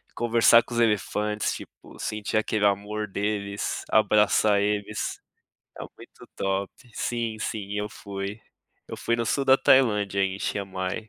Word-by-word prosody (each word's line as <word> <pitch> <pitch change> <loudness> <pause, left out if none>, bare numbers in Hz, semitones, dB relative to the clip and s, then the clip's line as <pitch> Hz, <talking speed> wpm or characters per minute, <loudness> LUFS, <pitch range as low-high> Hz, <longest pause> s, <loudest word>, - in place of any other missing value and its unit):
conversar 115 0 +5
com 120 - -10
os 120 - +1
elefantes, 105 0 0
tipo, - - -13
sentir 105 0 -4
aquele 110 -1 +1
amor 105 +2 0
deles, 100 0 -3
abraçar 105 -1 +4
eles, 105 +1 -2 0.6
é - - -6
muito - - -15
top. 95 0 -1 0.2
Sim, 115 -2 -2
sim, 105 -2 -4
eu 105 - -2
fui. 100 0 -6 0.5
Eu - - -7
fui 115 - -1
no 115 - -1
sul 140 +4 0
da 135 0 +6
Tailândia 105 -8 +3
em 95 0 0
Shiang 100 -1 -3
Mai. 95 +4 -4
105 Hz, 145 wpm, -26 LUFS, 100-110 Hz, 0.6 s, da